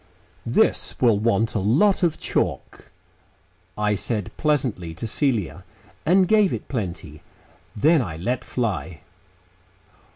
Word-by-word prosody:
"This - - +1
will 115 -5 +3
want 115 0 +1
a 110 - 0
lot 140 - +3
of 165 -3 +1
chalk," - - -3 0.9
I 105 0 +1
said 105 0 -2
pleasantly 125 - -1
to - - -6
Celia, 115 - -1 0.4
and 185 +2 +4
gave 210 -2 +4
it - - -5
plenty. 85 - -5 0.5
Then 155 +8 +4
I 90 -9 -5
let 120 +9 -2
fly.... 100 -8 -3
115 Hz, 120 wpm, -23 LUFS, 100-150 Hz, 0.9 s, and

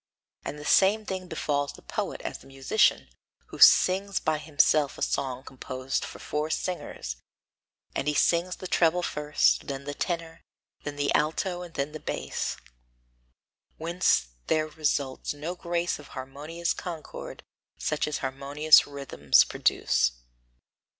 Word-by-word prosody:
And 150 - -5
the 150 - -9
same 210 +6 +4
thing 185 -2 -4
befalls 145 -3 -1
the - - -15
poet - - -4
as - - -5
the - - -17
musician, 135 +10 +2 0.4
who - - -10
sings 195 +2 +6
by 155 -1 0
himself 150 -1 +2
a - - -2
song 130 -2 -1
composed 130 0 -4
for - - -7
four 150 +1 -3
singers; 155 - -4 0.8
and 135 - -2
he 150 - +1
sings 175 +3 +2
the 185 - -7
treble 175 0 +2
first, 150 -2 +1
then 140 -1 -4
the 145 +1 -5
tenor, 165 0 -3 0.4
then 145 -1 -5
the 145 0 0
alto 175 +4 0
and 175 -2 -10
then 140 +2 -2
the 155 - -7
bass, - - -3 1.2
whence 165 - +1 0.2
there 155 0 +1
results 145 -3 -1
no 155 +4 -4
grace 175 -1 -2
of 145 - -12
harmonious 145 +6 -4
concord 170 -4 -7 0.3
such 155 -1 -1
as 150 - -1
harmonious 140 +3 +4
rhythms 140 - +3
produce. - - +1
150 Hz, 140 wpm, -27 LUFS, 140-170 Hz, 1.2 s, sings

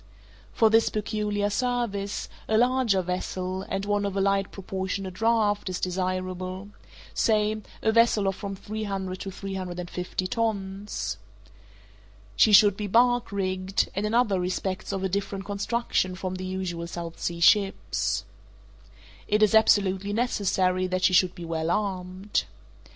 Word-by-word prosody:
For 220 -1 +3
this 225 +1 +4
peculiar 210 -1 -1
service, 235 -5 -1 0.2
a 220 - +2
larger 240 -5 +3
vessel, 185 +1 -3
and 195 +1 -2
one 205 0 +1
of 200 -1 -2
a - - +2
light 195 0 +1
proportionate 190 0 -4
draught, 215 -1 +1
is 185 - -3
desirable—say 185 +4 -2 0.2
a 220 - +3
vessel 225 -3 +4
of 195 - 0
from 200 -1 -5
three 215 +3 -5
hundred 190 -2 -4
to 195 - -5
three 195 +1 -6
hundred 180 -2 -5
and 175 0 -6
fifty 180 +1 -3
tons. 200 - -2 1.2
She 215 - +5
should 205 -1 +7
be 210 0 -4
bark 245 +3 +3
rigged, 190 -1 -1
and 200 - -2
in 210 +2 0
other 220 -6 +3
respects 185 +2 -2
of 195 -1 -3
a - - +2
different 195 0 -3
construction 200 -2 -1
from 185 0 -4
the 185 0 -5
usual 185 -2 -3
South 170 -1 -7
Sea 170 -1 -3
ships. 195 +3 +2 1.0
It 210 0 +3
is 215 - +4
absolutely 200 -2 +3
necessary 190 -5 +1
that 185 0 -2
she 185 - +4
should 180 0 +4
be 175 -3 -7
well 165 0 -2
armed. 190 0 -1
195 Hz, 150 wpm, -26 LUFS, 185-210 Hz, 1.2 s, should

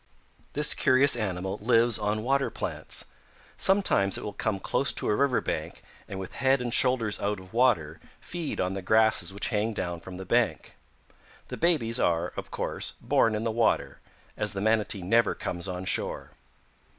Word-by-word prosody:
"This 150 +1 +3
curious 140 0 +4
animal 95 -3 -3
lives 115 0 +3
on 105 +1 -1
water 135 +2 +1
plants. - - -5 0.5
Sometimes 190 - +3
it - - -7
will 105 - -5
come 105 -2 -2
close - - 0
to - - -1
a - - +2
river 135 0 +2
bank - - -4 0.2
and 95 - -6
with 95 - -7
head 135 +1 +4
and 120 -2 -3
shoulders 125 -6 +2
out 100 0 -1
of 95 +1 -15
water 100 -11 +2 0.2
feed 170 -3 -5
on 90 +1 0
the 95 - -4
grasses 110 +2 +3
which 100 +1 -3
hang 110 0 0
down 85 -3 -3
from 90 +2 -9
the 95 - -7
bank. - - 0 0.8
The - - -5
babies 130 -9 +1
are, 85 0 +1
of - - -6
course, - - -4
born 120 -4 +2
in 105 - -2
the 115 - 0
water, 115 0 0 0.4
as 105 -2 -2
the 95 - -4
Manatee 110 -2 +1
never 115 +4 +2
comes 85 +1 -5
on 90 0 -5
shore. - - -3
110 Hz, 175 wpm, -27 LUFS, 95-125 Hz, 0.8 s, curious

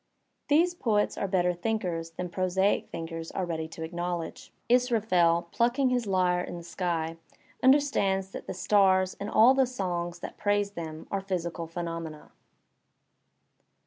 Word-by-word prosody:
These 335 +4 +4
poets 215 -11 +1
are 200 - -2
better 180 -2 +2
thinkers 175 -4 -2
than 180 +2 -5
prosaic 185 +2 +1
thinkers 165 0 -6
are 190 - -1
ready 160 -2 -3
to 160 0 -6
acknowl 175 0 -2
edge. - - -14 0.2
Israf 240 -4 +2
el, 170 -1 +4
plucking 250 +3 +2
his 245 -3 0
lyre 180 -2 +2
in 175 - -6
the 170 - -9
sky, 165 -2 -2 0.4
understands 230 -9 +3
that - - -8
the - - -3
stars 190 -1 +3
and 200 - -4
all 230 +4 +6
the 265 -1 +3
songs 175 -7 -3
that - - -7
praise 205 0 +1
them 160 -4 -7
are 195 - -1
physical 170 -3 -3
phenomena. 165 -2 -6
185 Hz, 150 wpm, -28 LUFS, 170-210 Hz, 0.4 s, all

